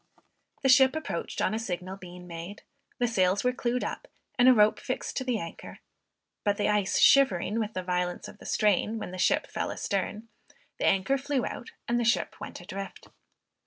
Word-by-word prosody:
The - - +3
ship 265 +2 +6
approached 315 - -3
on - - +1
a 220 - -1
signal 185 -3 -4
being 180 -2 -11
made, 170 +4 -8 0.3
the 245 - +1
sails 190 -3 +2
were 250 0 +2
clewed 245 0 -1
up, - - -5 0.3
and 250 0 +5
a - - +8
rope 210 -1 +4
fixed 255 - -4
to 260 - -1
the 250 -3 0
anchor; 165 -4 -8 0.7
but 205 -1 +1
the 205 - +1
ice 210 -2 +1
shivering 225 -5 +5
with 220 -1 -3
the 185 - -2
violence 180 0 -2
of - - -13
the - - -10
strain 210 +1 +2
when 215 - -5
the 185 - -7
ship 290 +11 +3
fell - - -3
astern, 205 +3 -3 0.5
the - - +1
anchor 195 +9 +2
flew 275 -2 -1
out 250 - -6 0.2
and 240 0 +1
the - - +1
ship 230 0 +1
went - - -7
adrift. 195 +2 -8
210 Hz, 195 wpm, -28 LUFS, 185-245 Hz, 0.7 s, a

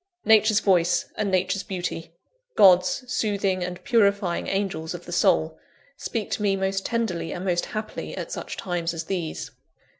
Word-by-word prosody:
Nature's 220 -1 +5
voice 180 -3 +3
and 210 -2 -1
Nature's 190 +1 +1
beauty 180 -3 -5 0.5
God's 185 +4 +5
soothing 200 -5 0
and 180 0 -6
purifying 200 -8 +2
angels 190 -5 -2
of - - -10
the - - -9
soul - - +2 0.4
speak 225 -4 -4
to - - -2
me 200 -2 +2
most 195 0 -1
tenderly 180 -9 -2
and 180 - -5
most 175 -2 0
happily, 215 0 -5
at - - -5
such - - -5
times 175 -2 -2
as 165 - -4
these. 170 -2 -4
190 Hz, 155 wpm, -25 LUFS, 175-205 Hz, 0.5 s, Nature's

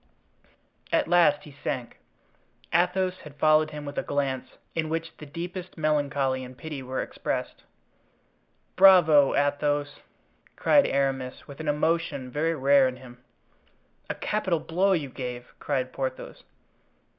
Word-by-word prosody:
At - - +2
last 165 -4 +4
he 150 - -12
sank. 125 -2 -4 0.7
Athos 180 +2 +1
had 150 -2 -12
followed 155 +1 +4
him 150 -1 -7
with 145 0 -4
a - - 0
glance 135 -2 -2 0.2
in 160 -1 -2
which 165 0 -3
the 150 - -10
deepest 175 +5 -7
melancholy 145 -4 0
and 125 0 -11
pity 155 -3 -6
were 130 0 -3
expressed. - - -4 1.1
"Bravo! 175 -7 +7
Athos!" 145 0 0 0.6
cried 285 - +4
Aramis, 135 -2 -2
with 140 +1 -11
an 160 - -5
emotion 150 -3 0
very 160 +4 0
rare 140 -1 +4
in 130 - -4
him. 125 -1 -14 0.9
"A - - -2
capital 190 -6 -1
blow 185 +5 +1
you 155 -6 -1
gave!" 125 -2 -7
cried 130 -3 -2
Porthos. 130 -1 -5
145 Hz, 135 wpm, -26 LUFS, 135-165 Hz, 1.1 s, Bravo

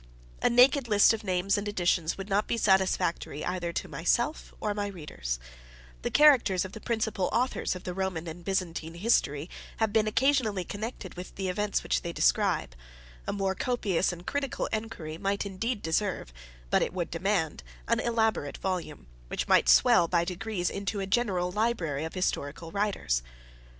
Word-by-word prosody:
A - - +4
naked 250 +2 +5
list 210 0 +6
of 220 0 -4
names 190 +1 +1
and 205 - -5
editions 175 -4 +1
would 195 0 -6
not 205 +1 +1
be 235 - 0
satisfactory 190 -7 +1
either 175 -1 -2
to - - -3
myself 240 - 0
or 210 - -1
my 205 0 -2
readers: 150 - -5 0.6
the - - -1
characters 255 -12 +5
of 190 - -7
the 220 - -9
principal 220 -5 -1
Authors 250 -5 0
of 180 - -8
the 180 - -4
Roman 185 -3 -3
and 170 +2 -7
Byzantine 170 -3 -2
History 170 -7 +1 0.3
have 220 -2 0
been 215 -1 +3
occasionally 225 -5 +2
connected 205 0 -6
with 180 +1 -9
the 190 -1 -2
events 205 +3 -1
which - - 0
they - - -4
describe; - - +1 0.5
a - - 0
more 195 -1 0
copious 195 -5 0
and 175 0 -9
critical 285 -1 -2
inquiry 170 -8 -4
might 200 +1 -1
indeed 205 +4 -3
deserve, 165 - -1 0.4
but - - +4
it - - -1
would 175 -2 -3
demand, 165 - 0 0.3
an - - +2
elaborate 220 -10 0
volume, 180 - -4 0.2
which - - -3
might - - +4
swell 60 - +6
by 170 0 +2
degrees 180 0 -2
into 200 +1 -3
a 195 - -1
general 190 -4 0
library 180 -9 0
of 160 - -7
historical 165 -3 -2
writers. 200 - 0
190 Hz, 170 wpm, -28 LUFS, 170-215 Hz, 0.6 s, list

